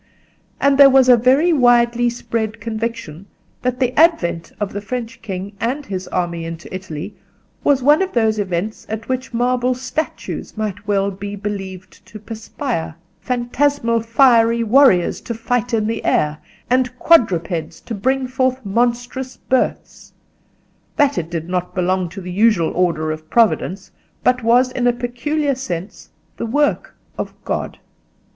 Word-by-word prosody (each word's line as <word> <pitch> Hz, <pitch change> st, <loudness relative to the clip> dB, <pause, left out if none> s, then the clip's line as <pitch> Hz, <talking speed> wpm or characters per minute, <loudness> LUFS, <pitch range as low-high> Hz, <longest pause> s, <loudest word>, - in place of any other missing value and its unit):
And 280 Hz, 0 st, +3 dB
there 280 Hz, -1 st, +10 dB
was 265 Hz, -1 st, +5 dB
a 250 Hz, -, +9 dB
very 265 Hz, +9 st, +3 dB
widely 240 Hz, -3 st, +4 dB
spread 230 Hz, -2 st, -3 dB
conviction 220 Hz, -6 st, -5 dB, 0.3 s
that 250 Hz, 0 st, -2 dB
the 250 Hz, -1 st, +1 dB
advent 280 Hz, -, +2 dB
of 205 Hz, -1 st, -3 dB
the 205 Hz, -, -4 dB
French 230 Hz, +1 st, -5 dB
king 195 Hz, -1 st, -6 dB
and 265 Hz, +5 st, -2 dB
his 185 Hz, -4 st, -5 dB
army 170 Hz, -2 st, -2 dB
into 165 Hz, +1 st, -8 dB
Italy 185 Hz, 0 st, -6 dB, 0.5 s
was 275 Hz, -3 st, +3 dB
one 295 Hz, +5 st, +5 dB
of 380 Hz, -, -2 dB
those 220 Hz, -2 st, +2 dB
events 195 Hz, +2 st, -3 dB
at 220 Hz, +1 st, -5 dB
which 260 Hz, 0 st, -3 dB
marble 250 Hz, +1 st, +1 dB
statues 260 Hz, -1 st, -5 dB
might 205 Hz, -1 st, -4 dB
well 200 Hz, -1 st, +1 dB
be 200 Hz, +1 st, -6 dB
believed 195 Hz, -2 st, -7 dB
to 210 Hz, -, -10 dB
perspire, 215 Hz, -, -5 dB, 0.2 s
phantasmal 245 Hz, -1 st, 0 dB
fiery 230 Hz, -1 st, +4 dB
warriors 230 Hz, -6 st, +4 dB
to 235 Hz, -, -5 dB
fight 245 Hz, +2 st, -1 dB
in 220 Hz, -2 st, +1 dB
the 225 Hz, +1 st, -2 dB
air, 150 Hz, 0 st, +1 dB, 0.3 s
and 255 Hz, 0 st, +1 dB
quadrupeds 175 Hz, -, +2 dB
to -, -, -7 dB
bring 260 Hz, +6 st, 0 dB
forth 255 Hz, -1 st, -1 dB
monstrous 245 Hz, +4 st, -1 dB
births—that 280 Hz, +2 st, -3 dB
it 165 Hz, -1 st, -5 dB
did 165 Hz, -1 st, -4 dB
not 180 Hz, 0 st, -3 dB
belong 185 Hz, -1 st, 0 dB
to 195 Hz, +3 st, -8 dB
the 180 Hz, 0 st, -7 dB
usual 200 Hz, -3 st, +3 dB
order 165 Hz, -3 st, 0 dB
of 155 Hz, 0 st, -7 dB
Providence, 195 Hz, -4 st, +1 dB, 0.3 s
but 250 Hz, 0 st, +2 dB
was 245 Hz, +3 st, +3 dB
in 245 Hz, -1 st, 0 dB
a 245 Hz, -, +4 dB
peculiar 275 Hz, +5 st, -1 dB
sense 190 Hz, -8 st, -6 dB, 0.3 s
the -, -, -3 dB
work 290 Hz, +6 st, 0 dB, 0.2 s
of -, -, -4 dB
God. -, -, -3 dB
230 Hz, 150 wpm, -19 LUFS, 190-255 Hz, 0.5 s, there